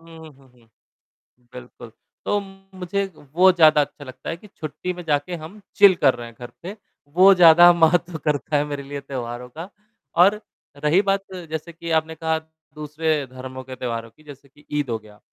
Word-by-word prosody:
हुँ, 165 -1 -13
हुँ, 135 -1 -22
हुँ, 120 -2 -26 0.9
बिल्कुल। 125 -2 -12 0.3
तो 205 - +1
मुझे 195 -1 -5
वो 165 +7 +3
ज़्यादा 155 -4 +5
अच्छा 145 0 -6
लगता 130 0 -9
है 165 - -4
कि 210 - -16
छुट्टी 180 0 -6
में 175 0 -9
जाके 150 +3 -1
हम 165 +6 -10 0.2
चिल 200 -2 +7
कर 135 -2 +6
रहे 120 -1 -8
हैं 115 - -14
घर 120 -1 -9
पे, 190 +4 -7 0.3
वो 185 +6 +6
ज़्यादा 175 0 +8
महत्व 170 0 +2
करता 150 +1 -1
है 145 - 0
मेरे 145 -1 -5
लिए 140 +1 -7
त्योहारों 125 -2 -6
का। 165 +8 -9 0.5
और 210 +3 +3 0.4
रही 155 +6 +4
बात 195 -1 0 0.3
जैसे 160 +2 -6
कि 170 0 -7
आपने 160 +1 -10
कहा 160 0 -1 0.4
दूसरे 150 0 -2
धर्मों 130 0 -8
के 130 0 -9
त्योहारों 115 -2 -5
की 155 - -24
जैसे 140 -2 -14
कि 145 +2 -23
ईद 145 -3 -1
हो 115 - -1
गया, 105 -1 -18
155 Hz, 190 wpm, -22 LUFS, 135-175 Hz, 0.9 s, ज़्यादा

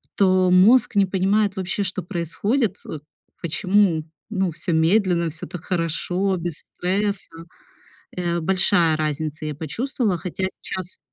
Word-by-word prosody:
то 185 -2 +3
мозг 210 +7 +5
не 200 -1 +5
понимает 195 +2 +1
вообще, 190 +2 -2
что 185 0 -2
происходит, 200 - -1
э, 155 - -5 0.4
почему, 180 -1 +2 0.3
ну, 190 -3 0
всё 165 +2 -3
медленно, 170 +1 +2
всё 160 +1 -8
так 180 - -8
хорошо, 180 +2 -1
без 170 -2 -4
стресса. 200 +2 -2 0.9
Э, 175 -1 -1
большая 175 -2 +3
разница, 155 0 -3
я 150 -2 -3
почувствовала, 210 - -2
хотя 180 +2 -5 0.2
сейчас 185 -1 -6
185 Hz, 130 wpm, -22 LUFS, 165-200 Hz, 0.9 s, мозг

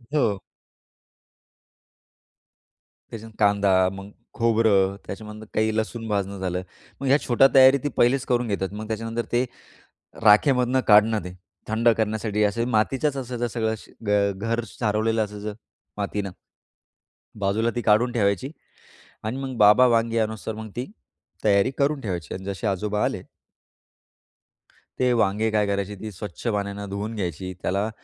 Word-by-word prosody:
हो. 105 -9 +2 2.7
त्याच्यात 110 0 -8
कांदा 100 -1 +3 0.2
मग 100 +1 -9 0.2
खोबरं 110 -4 +2
त्याच्यामधून 105 +1 -8
काही 110 0 +1
लसूण 115 +1 -3
भाजणं 100 -1 -2
झालं, 90 -1 -2 0.4
मग 135 - -3
ह्या 140 +2 +5
छोट्या 125 +2 +6
तयारी 130 +1 +7
ती 145 - 0
पहिलीच 130 +2 +3
करून 125 -1 0
घेतात. 100 -3 -2
मग 110 +1 -6
त्याच्यानंतर 115 +1 -3
ते 120 +2 +2 0.8
राखेमधून 125 +4 +4
काढणं 105 +1 +6
ते 90 - -7 0.4
थंड 115 +2 +2
करण्यासाठी 110 -1 -1
असं 115 +3 0
मातीचाच 130 +6 +1
असायचं 125 -2 -3
सगळं 110 -1 -1
श - - -16
घ 105 - -3 0.3
घर 115 +3 -1
सारवलेलं 110 0 0
असायचं 105 0 -6 0.4
मातीनं. 100 -1 -3 1.1
बाजूला 105 +4 +1
ती 120 - +1
काढून 115 +3 +3
ठेवायची 100 +3 0 0.7
आणि 110 +4 -3
मग 130 -2 -5
बाबा 105 +5 +7
वांगी 115 -1 +2
आणेतोवर 110 0 -2
मग 110 - -8
ती 125 +2 -4 0.5
तयारी 100 +3 +4
करून 140 +1 +1
ठेवायची 90 - -4
आणि 95 - -7
जसे 100 +1 -4
आजोबा 105 +2 0
आले - - -2 1.8
ते 125 -1 +3
वांगे 105 +2 +1
काय 105 -1 +2
करायची 100 0 -2
ती 110 -1 -6
स्वच्छ 105 +5 -7
पाण्याने 100 -1 -2
धुवून 105 +3 -4
घ्यायची. 95 -1 -4
त्याला 100 +3 -1
110 Hz, 135 wpm, -24 LUFS, 100-115 Hz, 2.7 s, तयारी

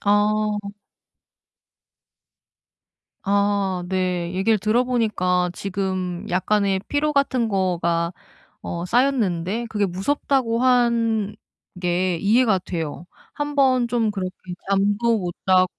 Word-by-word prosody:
아. 210 +1 +2 2.7
아. 200 -2 +1
네. 180 -2 -1
얘기를 210 +3 +2
들어 215 +5 +2
보니까 185 -7 +1
지금 185 -2 -3
약간의 195 +1 +1
피로 300 +1 0
같은 260 -5 +1
거가 175 -3 0 0.5
어 170 +1 -4
쌓였는데 225 -4 +1
그게 205 -2 0
무섭다고 230 +5 0
한 230 -4 +2 0.4
게 180 0 0
이해가 215 0 +3
돼요. 170 -1 -5 0.3
1 290 0 -4
번 255 -3 +3
좀 230 -3 0
그렇게 190 -3 -3 0.4
잠도 205 +4 +2
못 175 -3 -3
자고 185 -1 +5
200 Hz, 190 characters per minute, -22 LUFS, 185-235 Hz, 2.7 s, 자고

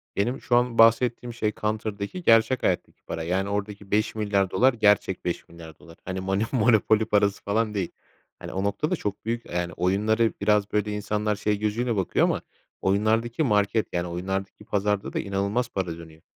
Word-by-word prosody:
Benim 120 +7 -1
şu 120 - +1
an 120 -1 +2
bahsettiğim 120 +1 +4
şey 110 -2 -1
Counter'daki 105 - -3
gerçek 115 0 +4
hayattaki - - -1
para. 80 - -5
Yani, 95 +4 -1
oradaki 100 0 -4
$5.000.000.000 105 +2 +2
gerçek 105 -4 +2
$5.000.000.000 85 -1 -7
Hani, 95 0 -3
Manü 95 +2 0
Monopoly 110 -2 +3
parası 100 -1 +1
falan 105 +1 0
değil. 95 -4 -2 0.5
Hani, - - -8
o 95 - -2
noktada 100 - 0
çok 105 - -5
büyük, 115 +1 -2
eee, - - -8
yani, 90 -1 -1
oyunları 105 +5 +1
biraz 105 0 +2
böyle 105 0 0
insanlar 105 +1 -1
şey 105 0 -1
gözüyle 115 +3 -1
bakıyor 95 -2 +2
ama - - 0 0.4
oyunlardaki 110 +7 +1
market, 105 -3 +2
yani, 85 0 -1
oyunlardaki 95 +4 -4
pazarda 105 0 -1
da - - -1
inanılmaz 100 +5 -1
para 90 -6 -3
dönüyor. 80 -1 -13
105 Hz, 160 wpm, -25 LUFS, 95-110 Hz, 0.5 s, bahsettiğim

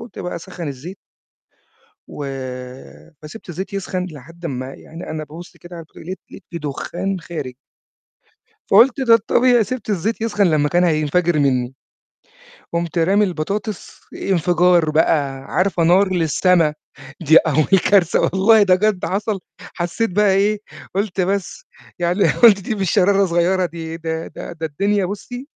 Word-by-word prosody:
وقُمت 230 +1 -11
بقى 180 - -4
أسخّن 170 -2 -7
الزيت 150 +8 -8 1.1
وفسِبت 135 - -9
الزيت 190 +4 -6
يسخن 185 -2 -3
لحد 165 +2 -11
أمّا 130 -2 -4
يعني 165 +2 -10
أنا 155 0 -4
بابُص 165 +4 -12
كده 175 0 -12
على 165 -1 -9
تق - - -23
لقيت 185 +3 -7
لقيت 200 - -12
في 170 - -5
دُخّان 175 +6 -4
خارج. 150 -7 -7 1.2
فقُلت 245 +6 +5
ده 235 -3 +5
الطبيعي، 240 +1 +3
سِبت 255 0 -6
الزيت 210 +3 -1
يسخن 205 -4 +1
لمّا 150 -2 +2
كان 175 +1 +2
هينفجر 160 +1 +1
منّي، 130 -3 +1 1.0
قُمت 170 0 -2
رامي 195 +5 +3
البطاطس 195 +3 -4
انفجار 175 -2 +2
بقى. 145 -3 +1
عارفة 180 0 0
نار 185 +3 +4
للسما 165 -1 +2 0.5
دي 160 0 +4
أول 155 +5 +4
كارثة 190 -5 +4
والله 205 +3 +4
ده 185 -2 +5
بجد 200 -1 0
حصل، 205 0 -2 0.3
حسّيت 175 +5 -2
بقى 200 0 +3
إيه، 205 +2 +2 0.4
قُلت 195 -1 -1
بس 200 - -2 0.3
يعني 175 +3 +2
قُلت 215 -5 +6
دي 220 - -3
مش 195 -4 -1
شرارة 200 0 +3
صغيّرة 175 +2 +1
دي 165 -1 -7
ده 160 0 -4
ده - - -9
ده 160 -1 -4
الدنيا 200 +6 0
بُصّي 245 - -7
180 Hz, 145 wpm, -19 LUFS, 160-200 Hz, 1.2 s, قُلت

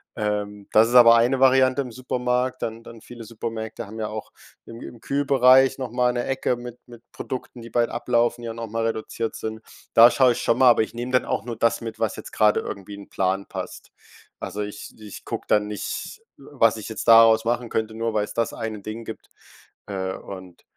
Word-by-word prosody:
Ähm, 105 -1 -3
das 110 +2 +5
ist 120 - -1
aber 115 -1 +9
eine 120 +3 +2
Variante 130 +1 +4
im 125 - -7
Supermarkt, 125 +1 -2
dann 115 +1 -5
dann 115 -1 -12
viele 120 -1 -11
Supermärkte 110 0 -6
haben 110 +2 -9
ja 110 - -2
auch 110 0 -7 0.3
irgendwie 115 0 -10
im 120 - -12
Kühlbereich 135 -1 +4
noch 130 -3 -4
mal 125 0 +1
'ne 120 0 -2
Ecke 130 -1 -1
mit 120 0 -9
mit 120 -1 -14
Produkten, 125 -2 -7
die 115 - -10
bald 120 0 +1
ablaufen, 120 0 0
die 120 - -6
ja 115 - -4
noch 115 0 -6
mal 115 +1 -2
reduziert 115 0 -3
sind. 110 0 -6 0.3
Da 115 +1 +8
schaue 130 -2 +4
ich - - -5
schon 115 +1 +1
mal, 130 -1 +7
aber 120 - +5
ich 110 - -8
nehme 120 +2 -5
dann 125 - +3
auch - - -2
nur 120 -2 -6
das 115 - +1
mit, 115 -1 -7
was 110 -2 -1
jetzt - - -10
grade 105 -1 +3
irgendwie 100 +1 -8
in 100 - -10
'n - - -20
Plan 95 +1 -1
passt. - - -8 0.5
Also, 100 +3 -5
ich 105 0 -7
ich 105 -2 -11
gucke - - -5
dann 105 0 +2
nicht, 105 - -6 0.2
was 130 -5 +1
ich 110 - -7
jetzt 110 - -6
daraus 115 0 +7
machen 120 +1 -1
könnte, 110 0 -2
nur 115 0 -2
weil's 105 -1 -2
das 115 - -1
eine 110 -3 -5
Ding 110 +3 -7
gibt. 110 - -9 0.6
Äh, 95 -2 -3
und 95 -3 -11
115 Hz, 215 wpm, -23 LUFS, 110-125 Hz, 0.6 s, aber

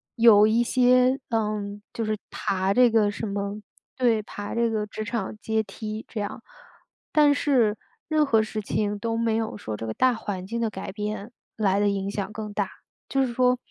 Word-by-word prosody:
有 225 -3 +7
一 230 +2 +3
些 250 +2 +4
嗯， 210 -2 -2
就 230 - -2
是 215 0 -1
爬 190 +1 0
这 250 0 +6
个 220 -2 +3
什 215 - -5
么 200 +1 -3 0.3
对， 235 -4 +2
爬 205 -1 -6
这 235 0 +2
个 215 -2 -1
职 215 +1 -5
场 215 -1 -3
阶 220 +1 0
梯 215 +2 -6
这 225 - -5
样。 205 - -4 0.7
但 295 -1 +6
是 245 -8 +2 0.3
任 310 -1 +3
何 225 -6 +3
事 215 0 -4
情 205 0 -1
都 225 +2 -2
没 230 -1 +1
有 220 -1 -3
说 110 - -5
这 115 - -5
个 110 - -3
大 255 - +3
环 200 -5 -5
境 230 +4 -3
的 225 - +1
改 190 -2 -6
变 210 +2 -4 0.2
来 200 -2 +2
得 205 - +3
影 200 0 -2
响 200 0 -3
更 210 -1 -6
大。 205 -2 -1 0.4
就 270 -1 +2
是 245 - -3
说， 250 +1 +3
215 Hz, 210 characters per minute, -25 LUFS, 205-235 Hz, 0.7 s, 有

